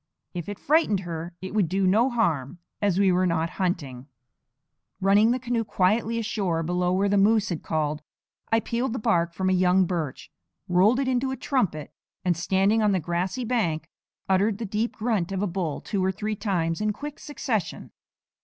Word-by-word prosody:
If 175 0 -5
it 205 - -5
frightened 290 - +2
her 170 -1 -6
it 190 - -5
would 205 -6 +2
do 190 +2 +1
no 220 +8 +4
harm, 170 - 0 0.2
as 200 -3 +2
we 195 -1 +4
were 180 +1 +2
not 165 0 0
hunting. 145 -8 -2 0.9
Running 200 +3 +4
the 245 - +2
canoe 240 -2 -1
quietly 220 +3 +1
ashore 195 -7 -1
below 180 +2 0
where 195 +2 +2
the 200 0 +3
moose 215 +1 +3
had 170 -4 -3
called, 155 -1 -2 0.5
I 225 0 +4
peeled 235 +2 -2
the - - -2
bark 175 -8 +1
from 190 - -1
a 185 - +3
young 185 +1 +4
birch, 165 -6 -4 0.4
rolled 190 +8 +4
it 275 - 0
into 260 +1 +1
a 265 - -3
trumpet, 230 - -1 0.3
and, 180 -1 +2
standing 195 +6 +2
on 210 -2 +3
the 190 - +2
grassy 180 - -2
bank, 170 -10 -1 0.4
uttered 195 +2 +2
the 230 - -4
deep 215 +4 -2
grunt 215 -6 -1
of 195 0 -1
a - - +2
bull 175 -5 -3
two 200 -3 -2
or 190 - +2
three 215 +2 -3
times 175 -5 -1
in 210 0 +1
quick 290 +6 -7
succession. 235 - -3
195 Hz, 190 wpm, -25 LUFS, 175-225 Hz, 0.9 s, no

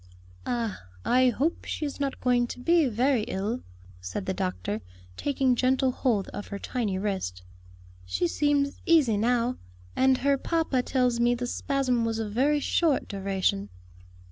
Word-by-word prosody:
"Ah, 230 - -2 0.2
I 255 +1 +4
hope 285 +7 -1
she 305 - -3
is 285 - -5
not 275 -1 -2
going 245 -1 +2
to 250 - -7
be 335 +3 +3
very 250 +2 +2
ill," 210 +6 -2 0.4
said 90 +1 -5
the - - -1
doctor, 90 +4 -3 0.3
taking 265 - +1
gentle 260 +1 +2
hold 230 -7 0
of 205 - -7
her 200 - -5
tiny 210 -3 -2
wrist. 190 - -3 0.6
"She 90 - 0
seems 285 - +1
easy 300 -10 +5
now, 240 +3 +1 0.4
and 260 0 +4
her 275 +1 +2
papa 320 -6 0
tells 250 -2 +1
me 240 +1 +3
the 245 +1 -3
spasm 255 -1 0
was 225 -1 -1
of 220 -2 -3
very 290 +5 +3
short 305 0 +1
duration." 190 - -1
245 Hz, 155 wpm, -27 LUFS, 205-270 Hz, 0.6 s, easy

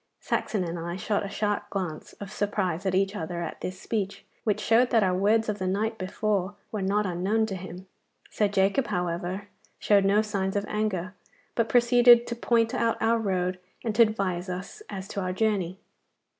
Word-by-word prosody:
Saxon 205 -4 -1
and 170 0 -4
I 170 +1 -4
shot 200 +2 -1
a 200 - -4
sharp 205 0 -1
glance 180 -6 -4
of 200 -1 -9
surprise 195 -4 -1
at 185 - +1
each 195 +2 +1
other 170 -1 -3
at 165 - -6
this 185 0 -5
speech, 200 -3 -3 0.2
which 210 -2 +1
showed 230 +3 +4
that 225 -3 +4
our 185 -1 +2
words 215 +4 +3
of 210 -1 -2
the 185 - -1
night 220 +4 -1
before 195 +1 -1 0.2
were 215 - -3
not 205 +2 +1
unknown 190 +5 +1
to 200 -3 -4
him. 185 0 -8 0.5
Sir 210 - +2
Jacob, 200 +6 +2
however, 180 +3 -2 0.3
showed 200 -2 +4
no 205 +2 +4
signs 195 -2 -2
of 205 0 0
anger, 200 -4 -2 0.4
but 230 -1 0
proceeded 240 0 +6
to 235 - -4
point 230 -1 +2
out 230 -1 +1
our 230 +1 +2
road 185 -3 -1 0.2
and 225 - -1
to 225 - +4
advise 195 -5 +1
us 190 - -6
as 190 -1 -6
to 200 - -3
our 185 0 -2
journey. 190 -3 0
200 Hz, 190 wpm, -27 LUFS, 185-220 Hz, 0.5 s, proceeded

